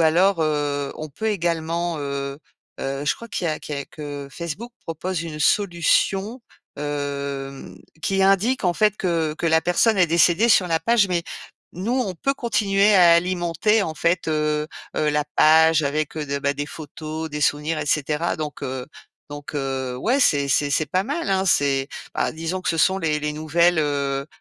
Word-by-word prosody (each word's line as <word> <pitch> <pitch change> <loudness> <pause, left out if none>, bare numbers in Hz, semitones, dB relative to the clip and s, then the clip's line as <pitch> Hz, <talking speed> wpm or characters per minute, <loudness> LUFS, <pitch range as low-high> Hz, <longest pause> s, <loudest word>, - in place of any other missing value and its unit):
alors, 170 +3 +3
heu, 145 -2 -1
on 155 - -6
peut 220 +10 -5
également, 170 -3 -1
heu 140 -1 -4 0.4
heu, 135 +1 -3
je - - +2
crois 230 - -10
qu'il 175 - -3
y - - +1
a 155 - -3
qu'il 150 - -6
y - - -3
a 140 - -5
que 145 -2 -7
Facebook 170 +10 -6
propose 165 +1 -4
une 155 -2 -6
solution, 195 - +1 0.4
hem, 140 -2 -4 0.2
qui 195 +3 +1
indique, 195 +7 +3
en 180 -3 +1
fait, 210 +1 +2
que 165 -5 -1
que 165 - -3
la 160 0 +4
personne 195 +5 +2
est 180 - +5
décédée 170 +6 +3
sur 190 -5 +4
la 165 -1 +2
page. 210 +3 +2
Mais 175 -2 0 0.5
nous, 190 +7 -3
on 200 -8 -1
peut 275 +11 -1
continuer 205 -4 +2
à 175 -3 +7
alimenter, 175 +4 +1
en 160 -5 -3
fait, 170 +1 0
heu 150 -1 0 0.3
heu, 155 - +1
la 150 0 0
page, 160 +1 +5
avec, 150 +2 -2
heu 150 - -2
de 140 0 -2
bah, 140 0 0
des 145 +1 -4
photos, 155 +1 -7
des 150 0 -4
souvenirs, 150 +2 0
et 150 - -4
cetera. 150 +3 0
Donc, 150 -2 -6
heu, 130 -2 -4 0.4
donc, 145 0 -8
heu, 135 -3 -3
ouais, 245 - +1
c'est 140 - +3
c'est 145 +2 +2
c'est 155 - +1
pas 185 +3 +2
mal, 285 +2 -3
hein? 190 0 +2
C'est, 140 -4 +2 0.3
bah, - - 0
disons 165 +4 -4
que - - -2
ce 165 - -2
sont 190 +4 +3
les 155 -4 0
les 150 0 -2
nouvelles, 165 +3 +2
heu 140 -2 -1
160 Hz, 190 wpm, -22 LUFS, 145-185 Hz, 0.5 s, à